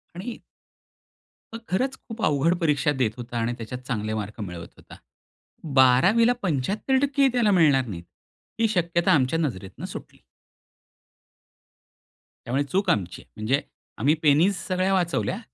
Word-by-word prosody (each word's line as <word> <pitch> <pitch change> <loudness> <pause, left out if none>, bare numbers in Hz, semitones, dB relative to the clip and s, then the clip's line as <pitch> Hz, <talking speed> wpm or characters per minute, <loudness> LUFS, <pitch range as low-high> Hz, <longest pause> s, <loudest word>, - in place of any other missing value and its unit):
आणि 220 +7 -6 1.2
मग 230 - -5
खरंच 260 +9 0
खूप 225 -1 -10
अवघड 150 +4 +2
परीक्षा 150 -3 +2
देत 110 -4 +2
होता 120 0 -6
आणि 115 +1 -1
त्याच्यात 120 +2 -7
चांगले 110 -3 -2
मार्क 105 +1 -5
मिळवत 90 -4 -7
होता. - - -14 0.8
12वीला 190 - +5
75% 260 - 0
ही 270 - +5
त्याला 235 -4 +3
मिळणार 150 -8 +4
नाहीत, 90 -7 -7 0.6
ही 225 - +3
शक्यता 170 -2 +1
आमच्या 150 0 +2
नजरेतून 100 - -4
सुटली. - - -9 2.3
त्यामुळे 135 +4 0
चूक 190 +8 -1
आमची 90 -3 -1
आहे. - - -24
म्हणजे, 120 +7 0 0.4
आम्ही 140 +6 +3
p 160 +7 +4
सगळ्या 185 +1 +1
वाचवल्या 180 +2 0
150 Hz, 130 wpm, -24 LUFS, 120-195 Hz, 2.3 s, 12वीला